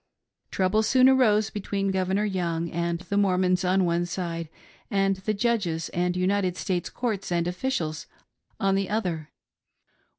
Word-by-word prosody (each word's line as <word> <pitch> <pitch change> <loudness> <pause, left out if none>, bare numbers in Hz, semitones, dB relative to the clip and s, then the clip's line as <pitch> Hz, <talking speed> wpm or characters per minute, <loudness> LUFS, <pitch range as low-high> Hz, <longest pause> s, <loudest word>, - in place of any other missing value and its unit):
Trouble 195 +3 +1
soon 255 +4 +5
arose 220 -5 +4
between 195 -1 -2
Governor 190 +2 0
Young 170 -4 -2
and 170 0 -1
the 200 +2 -3
Mormons 185 -2 +2
on 185 +1 +2
one 170 0 0
side 170 -2 -4 0.4
and 195 -3 +1
the 190 +3 -2
Judges 200 -8 0
and 180 +1 -1
United 185 0 +1
States 180 -3 -2
courts 215 -7 -3
and 170 0 +1
officials 175 - -2 0.5
on 195 0 +2
the 195 0 0
other. 180 -8 -2
190 Hz, 140 wpm, -26 LUFS, 175-205 Hz, 0.5 s, soon